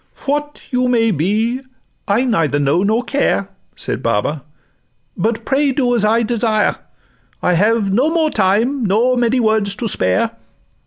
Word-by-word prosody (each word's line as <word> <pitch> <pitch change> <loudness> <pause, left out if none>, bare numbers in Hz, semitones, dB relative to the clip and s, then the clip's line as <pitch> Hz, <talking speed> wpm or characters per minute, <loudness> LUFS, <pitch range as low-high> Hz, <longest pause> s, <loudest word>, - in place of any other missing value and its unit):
'What 295 +1 -2
you 250 0 +1
may 230 -2 +2
be, 215 - 0 0.5
I 205 +5 +2
neither 165 - +1
know 145 +4 +1
nor 220 +5 +1
care,' 245 -7 0 0.3
Said - - -4
Baba; 140 +9 -1 0.7
'but 225 +4 -2
pray 280 +1 +1
do 250 -2 0
as 235 -3 +2
I 225 +2 +3
desire: 220 -2 0 0.7
I 180 - +2
have 205 +2 +1
no 260 +9 +2
more 320 -2 +1
time 220 +7 +1
nor 225 +5 +2
many 245 +1 +1
words 215 -3 +1
to 230 - -3
spare. 95 - 0
225 Hz, 150 wpm, -17 LUFS, 200-250 Hz, 0.7 s, I